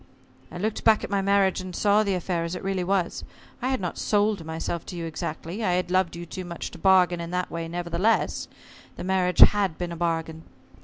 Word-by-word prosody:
I - - -7
looked 215 +4 -2
back 220 -1 +4
at - - -5
my 200 -1 +1
marriage 195 -1 +2
and 185 -1 -7
saw 205 0 +3
the 200 -3 0
affair 175 -1 -2
as 170 +2 -3
it 180 - -7
really 190 -1 -1
was. 185 -1 -1 0.4
I 250 - -1
had 265 - 0
not 180 -3 -4
sold 205 -3 +1
myself 160 +1 -4
to 180 - -6
you 170 -1 -4
exactly 165 +5 -5
I 185 -4 +2
had 180 0 -1
loved 185 -2 +1
you 170 0 -7
too 185 +2 -6
much 170 -1 -6
to - - -11
bargain 180 -2 +4
in 170 - -5
that 180 0 -2
way; 165 0 -4
nevertheless, 175 +5 0 0.5
the - - -7
marriage 185 -1 +1
had 200 -6 +6
been 175 -1 -4
a - - -4
bargain. 165 -1 -2
180 Hz, 220 wpm, -25 LUFS, 170-195 Hz, 0.5 s, had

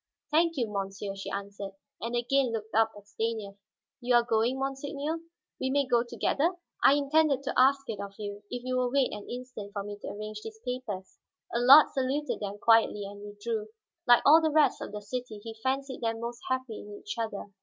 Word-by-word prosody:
"Thank 330 +1 +3
you, 245 - +2
monsieur," 195 -1 -4
she 195 - -6
answered, 200 0 -5 0.3
and 235 +2 -3
again 250 +1 +2
looked 220 -1 -5
up 225 0 +4
at 205 - -13
Stanief. 220 -1 -3 0.5
"You 245 -1 +2
are 240 - +6
going, 235 +2 +1
monseigneur? 280 +3 -3 0.4
We 260 - -1
may 280 +1 +2
go 240 -2 +3
together?" 300 +7 0 0.3
"I - - +8
intended 285 -1 +2
to 275 - -2
ask 275 +1 +4
it 220 -3 -4
of 200 0 -7
you, 205 -1 -6
if 245 0 -5
you 255 0 -1
will 250 -1 +1
wait 270 0 +2
an 210 - -8
instant 245 -5 -7
for 200 - -3
me 205 0 -7
to - - -6
arrange 215 +1 -6
these 220 0 -9
papers." 235 -7 -5 0.3
Allard 260 +6 +8
saluted 275 +3 -1
them 205 -1 -4
quietly, 225 -2 +4
and 200 +1 -9
withdrew. 210 +1 -4 0.4
Like 240 -1 +7
all 315 +3 +8
the 320 - +2
rest 305 0 +3
of - - -5
the 210 0 -6
city, 245 0 -5
he 225 -1 -6
fancied 265 +1 -2
them 225 -1 -1
most 235 +1 -5
happy 260 -4 -2
in 205 0 -9
each 205 - -6
other. 205 -3 -4
235 Hz, 200 wpm, -29 LUFS, 210-265 Hz, 0.5 s, I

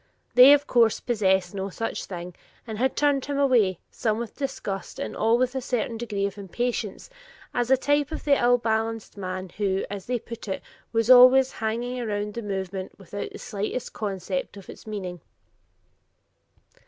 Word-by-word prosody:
They, 250 +3 +9
of 290 0 +3
course, 230 -5 +3
possessed 190 -6 +1
no 195 0 -3
such 225 +4 -4
thing, 175 -1 -7 0.3
and 220 -2 -6
had 260 +2 +1
turned 285 -2 +2
him 285 -1 -3
away, 240 - +3
some 220 -2 -1
with 235 -2 -5
disgust 235 -8 -4
and - - -4
all 225 +2 +3
with 255 0 +1
a 265 - -2
certain 240 -2 -2
degree 215 -4 -2
of 200 +1 -4
impatience, 215 +1 -3 0.5
as 245 0 0
a 265 - +6
type 290 +3 +1
of 315 - -5
the 280 -2 +3
ill 245 0 +5
balanced 225 -1 -2
man 185 -1 -5
who, 195 -2 0
as 200 -2 -6
they 250 0 0
put 230 -1 -9
it, 190 - -3 0.3
was 225 +1 +3
always 255 +1 +8
"hanging 240 +3 -3
around 210 -3 -2
the 235 - -4
movement, 190 -2 -4
without 200 +1 -6
the - - -8
slightest 210 +5 -4
conception 195 -2 -3
of 195 - -10
its - - -14
meaning." 185 -5 -5
225 Hz, 175 wpm, -25 LUFS, 195-250 Hz, 0.5 s, They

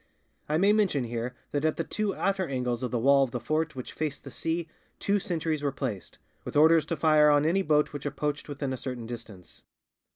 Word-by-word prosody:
I 155 - +2
may 200 +4 +4
mention 195 -11 +2
here 120 +1 -4 0.2
that 145 0 -1
at 155 0 +1
the - - 0
two 210 -2 -2
outer 190 -2 0
angles 125 -3 -2
of 125 - -2
the 125 - -1
wall 140 +4 +5
of 135 - -1
the 125 - -4
fort 155 +5 -1
which 125 - -7
faced 150 -3 -3
the 135 - -9
sea 165 +3 -2 0.3
two 200 +1 +1
sentries 160 -4 -2
were 145 -1 0
placed, 125 -9 -5 0.3
with - - -7
orders 160 +1 +6
to 165 - -1
fire 155 -1 +5
on 145 0 +4
any 180 +5 +3
boat 150 -4 +2
which 145 0 -4
approached 150 +1 -3
within 140 -2 -3
a - - -3
certain 125 -2 -5
distance. 115 -6 -10
145 Hz, 220 wpm, -28 LUFS, 125-160 Hz, 0.3 s, orders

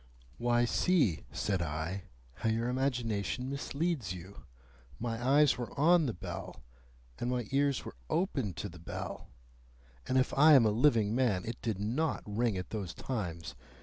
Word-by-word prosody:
"Why, 120 0 +3
see," 120 - +2
said 95 +5 -1
I, 85 +5 -3 0.3
"how 115 - 0
your 115 +2 0
imagination 125 -2 -1
misleads 140 - -2
you. 95 +3 -11 0.5
My 115 0 -3
eyes 140 +1 +4
were 120 - -6
on 165 0 +5
the 120 - -1
bell, 70 -5 -7 0.6
and 120 - -1
my 125 -2 -1
ears 140 -1 +1
were - - -8
open 135 - 0
to 105 - -4
the 90 -3 -11
bell, 80 - -6 0.8
and 130 - +2
if 130 - +2
I 150 +3 +8
am 130 -5 +7
a 110 - +4
living 110 -3 +3
man, 115 -8 +1
it 115 +1 -5
did 110 -4 -2
NOT 125 +10 -1
ring 110 0 0
at 90 -1 -6
those 100 -6 -4
times. 85 -10 -4
115 Hz, 160 wpm, -32 LUFS, 100-135 Hz, 0.8 s, I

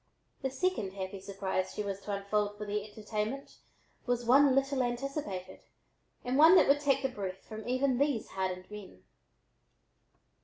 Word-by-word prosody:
The 265 - -1
second 260 - -1
"happy 190 0 -5
surprise" 190 -1 -3
she 210 - -2
was 200 -1 -4
to 205 - -6
unfold 205 +1 -1
for 210 - -5
their 205 0 -2
entertainment 215 +4 -4 0.5
was 245 -1 0
one 270 +2 +6
little 275 0 +2
anticipated 240 -7 -3 0.7
and 255 +3 +1
one 325 +4 +9
that - - +6
would 280 +1 +5
take 275 -2 +2
the - - +3
breath 195 -6 -6
from 220 0 -8
even 255 0 +1
these 280 -5 +1
hardened 185 0 -3
men. 195 - -10
215 Hz, 155 wpm, -31 LUFS, 195-270 Hz, 0.7 s, one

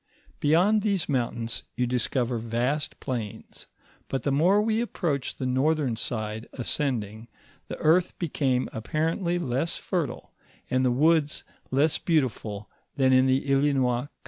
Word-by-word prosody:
Beyond 180 +8 +4
these 200 -5 0
mountains 120 -4 -2
you 125 - +1
discover 125 0 0
vast 120 +6 -2
plains, 120 -6 -6 0.4
but 135 - -3
the 140 - +1
more 175 +9 +4
we 220 +1 +1
approach 160 - -2
the 130 - -4
northern 135 0 +1
side 110 -1 -4
ascending, 115 -4 -2 0.4
the - - -6
earth 170 +3 +2
became 135 -6 0
apparently 165 - -1
less 140 0 -1
fertile, 165 -10 -3 0.4
and 130 0 +2
the 130 - +3
woods 150 +4 +2 0.3
less 145 +4 +2
bean 160 -4 +3
tiful 105 -4 -5 0.3
than 130 -1 +3
in 130 0 +5
the 130 +1 +3
Islinois 135 -3 +2
country. - - -19
135 Hz, 140 wpm, -26 LUFS, 120-160 Hz, 0.4 s, in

